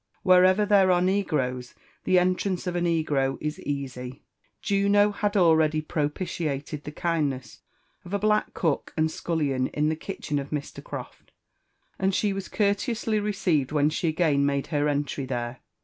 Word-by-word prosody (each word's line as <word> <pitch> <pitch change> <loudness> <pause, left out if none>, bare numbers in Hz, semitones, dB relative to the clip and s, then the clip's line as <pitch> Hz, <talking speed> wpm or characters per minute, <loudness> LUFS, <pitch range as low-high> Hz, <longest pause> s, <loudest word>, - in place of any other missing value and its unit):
Wherever 185 +2 +5
there 200 -2 +4
are 180 -1 +4
negroes, 150 -10 -1 0.3
Iks 185 - +4 0.3
ontmiee 190 -3 -2
of 180 -1 -2
a 175 - 0
Degro 155 -6 +1
is 150 0 -4
easy: 130 -2 -5 0.4
Juno 200 +1 +3
had 205 0 -1
already 160 -3 +4
propitiated 150 -1 -3
the 150 - -5
luttdiiess 150 -5 -2 0.4
of 175 - -11
a 200 - +1
black 210 +1 +1
cook 160 -5 -1
and 160 0 +2
scullion 140 -8 -1
in 150 +1 0
the 160 - 0
kitchen 155 -3 -4
of 140 0 -6
Mr. 150 -2 -5
Croft, - - -9 0.7
and 190 0 +1
she 205 -2 +1
was 195 -1 -5
apor 200 -2 +2
teously 220 -1 -2
received 175 -9 0
\Hien 150 0 +2
she 170 - -1
again 155 -3 +2
made 140 -1 0
her 145 0 +2
entry 145 -2 -2
thers. 120 -1 -3
160 Hz, 160 wpm, -26 LUFS, 145-190 Hz, 0.7 s, Wherever